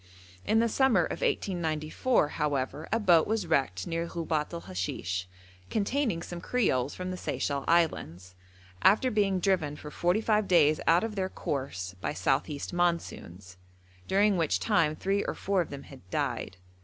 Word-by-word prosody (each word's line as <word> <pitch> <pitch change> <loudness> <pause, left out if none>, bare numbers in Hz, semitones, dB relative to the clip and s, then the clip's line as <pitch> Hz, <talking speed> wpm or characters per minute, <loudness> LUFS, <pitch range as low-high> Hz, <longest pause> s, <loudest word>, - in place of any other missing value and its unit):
In 220 - +3
the 230 +1 +4
summer 265 +2 +3
of - - -5
1894, 170 - 0
however, 145 0 -2
a 225 - +2
boat 175 -7 +4
was 220 -3 0
wrecked 135 - 0
near 165 0 -2
Ghubet 160 -3 -2
el 170 -1 -5
Hashish, 90 0 -4 0.4
containing 220 -4 0
some 175 -1 -7
creoles 145 - 0
from 185 0 -4
the 185 - -4
Seychelle 140 -5 -2
Islands, 95 - 0 0.5
after 220 +6 +4
being 200 -3 +2
driven 175 -6 +1
for 150 0 -9
forty 175 +6 +1
five 215 -2 +1
days 155 -4 +4
out 170 +3 +5
of 225 -1 -3
their 190 -2 -2
course 115 - -4
by - - -2
south 135 +4 +1
east 145 +2 -5
monsoons, 100 - -2 0.5
during 200 0 +3
which 165 -3 +1
time 165 -8 +2
three 195 +4 0
or - - -3
four 195 -1 0
of 170 - -4
them 140 -1 -7
had 130 -10 -15
died. 95 - -2
170 Hz, 165 wpm, -29 LUFS, 145-200 Hz, 0.5 s, out